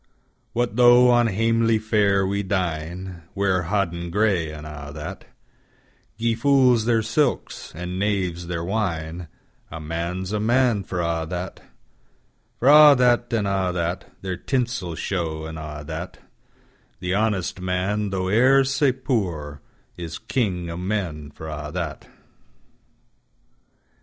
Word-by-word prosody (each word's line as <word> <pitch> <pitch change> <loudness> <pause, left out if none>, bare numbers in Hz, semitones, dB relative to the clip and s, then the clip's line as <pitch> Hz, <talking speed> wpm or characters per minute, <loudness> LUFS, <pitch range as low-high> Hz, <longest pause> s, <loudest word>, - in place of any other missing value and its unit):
What 120 -1 -1
though 125 0 +7
on 120 -1 +4
hamely 115 +2 +2
fare 105 -3 +2
we 100 +1 -1
dine, 90 -1 -3
Wear 95 -3 +1
hoddin 85 -2 -1
grey, 95 -4 +1
an' 75 0 -9
a 75 -1 -8
that; 75 +1 -7 0.9
Gie 115 +1 +1
fools 125 -2 +4
their 115 -2 +2
silks, 120 +5 -1
and 90 +2 -5
knaves 95 -4 -1
their 85 -1 -3
wine;A 85 -4 -5
Man's 85 +4 -4
a 105 - 0
Man 120 -1 +2
for 90 -2 -3
a' 85 -1 -1
that:For 90 - -9
a' 150 0 +9
that, 120 -1 +2
and 110 -4 0
a' 95 -2 0
that, 85 0 -3
Their 95 -2 -3
tinsel 120 -10 -2
show, 80 -4 -3
an' 80 0 -7
a' 75 -1 -7
that; - - -6 0.8
The 90 0 -2
honest 100 -3 0
man, 95 +3 -1
tho' 95 -1 -2
e'er 130 +7 +5
sae 135 +1 +2
poor, 90 - -2 0.4
Is 85 -2 -6
king 95 -9 -2
o' 85 - -5
men 90 -6 -3
for 80 +2 -10
a' 75 -1 -5
that. 85 -5 -4
95 Hz, 130 wpm, -23 LUFS, 85-115 Hz, 0.9 s, a